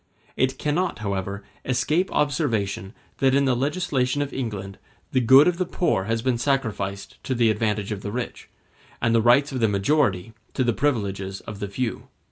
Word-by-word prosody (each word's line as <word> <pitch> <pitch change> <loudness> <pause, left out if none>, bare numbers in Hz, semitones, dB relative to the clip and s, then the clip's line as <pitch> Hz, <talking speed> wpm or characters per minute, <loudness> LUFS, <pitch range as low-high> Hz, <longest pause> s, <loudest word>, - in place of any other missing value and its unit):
It 130 0 +1
cannot, 170 +5 -1
however, 100 0 -3 0.2
escape 150 +8 0
observation 115 - 0 0.3
that 135 -1 +3
in 140 0 +3
the 130 -2 +2
legislation 145 -1 0
of 140 - -7
England 100 -6 -5 0.3
the 130 - +3
good 130 +6 +7
of 180 0 +1
the 185 - +1
poor 170 - 0
has 115 +1 -1
been 125 -2 +1
sacrificed 110 -7 -2
to 130 - -2
the 115 -2 +4
advantage 105 -1 -1
of 100 -2 -3
the 100 - -5
rich, 125 +2 -5 0.5
and 115 0 +1
the 115 - +4
rights 125 +6 +4
of 130 - -3
the 115 - +3
majority 105 -1 +1 0.2
to 130 - +2
the 120 -1 +2
privileges 100 -8 -1
of 105 -3 -8
the 100 - -3
few. 115 +4 -3
120 Hz, 180 wpm, -24 LUFS, 100-140 Hz, 0.5 s, good